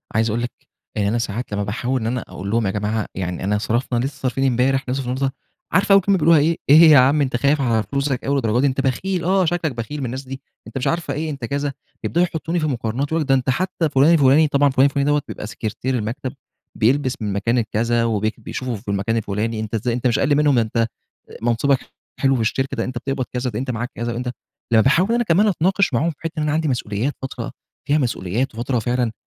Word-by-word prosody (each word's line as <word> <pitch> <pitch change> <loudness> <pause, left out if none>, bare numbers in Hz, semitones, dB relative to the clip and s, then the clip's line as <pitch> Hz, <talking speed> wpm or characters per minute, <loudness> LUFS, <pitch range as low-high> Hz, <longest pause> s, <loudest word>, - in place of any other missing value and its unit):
عايز 110 +1 +2
أقول 115 +3 -1
لِك 120 - -3 0.4
يعني 105 -1 +1
أنا 115 - 0
ساعات 115 +1 -3
لما 100 0 -1
باحاول 120 +5 -2
إن 110 - -2
أنا 125 +1 -1
أقول 95 +2 -7
لهم 115 0 +1
يا 95 - +1
جماعة 105 +1 -1
يعني 90 -1 -4
أنا 105 +2 +1
صرفنا 120 +3 -1
لسه 140 +1 -4
صارفين 130 +1 0
امبارح 130 +2 +2
هنصرف 130 +1 -2
النهاردة؟ 130 +2 -1 0.4
عارفة 190 +3 +4
أول 195 - +7
كلمة 195 +1 +2
بيقولوها 165 -1 +5
إيه؟ 160 +3 +2
إيه 145 - +9
يا 150 - +8
عم 140 +4 +4
أنت 130 -3 0
خايف 140 +4 +2
على 115 -4 +1
فلوسك 140 +4 -2
أوي 140 - +1
للدرجة 120 -3 +1
دي، 140 - +3
أنت 135 0 0
بخيل 175 +8 -1
آه 190 +2 +2
شكلك 165 -2 0
بخيل 120 +5 -5
من 135 - -2
الناس 130 +3 -4
دي، 135 0 -8 0.3
أنت - - -6
مش 135 +2 -1
عارفة 165 +4 -1
إيه 155 +1 -3
أنت 140 -5 -5
كذا، 140 +2 -2 0.3
يبدأوا 175 +1 +2
يحطوني 170 0 -3
في 155 - 0
مقارنات، 130 +2 -2
ده 150 -4 +2
أنت 130 0 -1
حتى 170 +3 0
فلان 145 +4 +5
الفلاني 150 0 +5
طبعًا 140 0 +3
فلان 130 0 +4
الفلاني 140 +1 +1
بيبقى 105 - -6
سكرتير 120 +4 -3
المكتب، 125 +4 -4 0.4
بيلبس 130 +3 +2
من 105 -2 -2
مكان 115 +5 0
الكذا 115 +1 +1
وبي 110 -2 0
وبيشوفوه 130 -2 -5
في 100 - -12
المكان 100 +3 0
الفلاني، 110 +1 -2
أنت 110 +1 -4
ازاي 115 +2 -1
أنت 125 +1 0
مش 120 - +1
أقل 145 +1 +3
منهم، 145 -1 +3
ده - - +4
أنت 115 +1 0 0.5
منصبك 120 +4 +2 0.4
حلو 135 -1 +3
في 120 - 0
الشركة، 135 +5 -1
ده 115 - 0
أنت 130 -1 -5
بتقبض 130 +1 -2
كذا 125 0 -1
ده 110 -1 -4
أنت 130 0 -2
معاك 120 +1 -4
كذا 120 +1 -3
وأنت 125 +1 -3 0.4
لما 110 - +7
باحاول 170 - +3
أنا 240 0 +2
كمان 205 +1 +3
أتناقش 190 -2 +1
معاهم 145 +8 +2
فى - - -14
حِتّة 165 0 -5
إن 155 - 0
أنا 150 - 0
عندي 155 +1 0
مسؤوليات، 120 0 -1
فترة 135 - -5 0.4
فيها 145 - +3
مسؤوليات، 120 -1 -1
وفترة 120 +2 -1
فعلًا 120 +1 0
130 Hz, 230 wpm, -21 LUFS, 115-145 Hz, 0.5 s, إيه